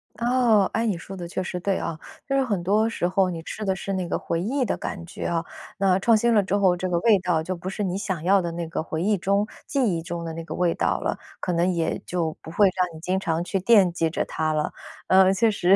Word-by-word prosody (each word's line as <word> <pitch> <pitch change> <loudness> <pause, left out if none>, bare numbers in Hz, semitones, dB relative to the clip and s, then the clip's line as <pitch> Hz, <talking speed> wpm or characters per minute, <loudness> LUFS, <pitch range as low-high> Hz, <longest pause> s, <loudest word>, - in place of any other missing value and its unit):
哦， 235 -4 +3
诶， 230 0 +1
你 195 -5 0
说 195 +3 -9
的 175 -2 -6
确 185 +2 -3
实 180 -1 -4
对 195 +1 0
啊， 160 -1 -4 0.3
就 275 - 0
是 270 - +3
很 205 -8 -1
多 210 +5 +2
时 180 -6 -1
候 185 0 +2
你 165 -2 -5
吃 215 - -6
的 190 -2 0
是 195 +1 -4
那 185 -2 -2
个 - - 0
回 165 - -2
忆 255 +7 0
的 205 - 0
感 175 -3 -6
觉 - - -7
啊， 165 -1 -1 0.3
那 190 -1 +3
创 225 +2 +4
新 235 +2 +2
了 210 - +5
之 195 +1 -1
后， 190 -3 +4
这 185 +1 -3
个 175 - +1
味 215 -3 +5
道 175 -3 0
就 185 +2 -3
不 180 +2 -6
是 205 +2 -3
你 185 -1 -1
想 185 -6 -3
要 195 +2 +4
的 170 -1 -3
那 170 0 -4
个 160 - -3
回 160 0 -3
忆 210 +2 +3
中、 200 +2 +1 0.2
记 275 -2 +1
忆 165 - -2
中 170 0 -5
的 165 - -4
那 165 0 -6
个 - - -6
味 175 -2 +2
道 - - 0
了， - - -2 0.2
可 180 - -2
能 175 +2 +2
也 165 -2 -1
就 165 -3 -2
不 - - -10
会 200 +4 +4
让 180 -3 -1
你 - - -9
经 185 +3 -1
常 165 -2 -1
去 195 +1 -1
惦 195 -4 +5
记 165 -2 0
着 - - -2
它 155 0 -1
了。 150 0 -1 0.4
呃， 190 0 +6
确 220 +3 +3
实， 190 -2 +4
185 Hz, 295 characters per minute, -24 LUFS, 170-200 Hz, 0.4 s, 呃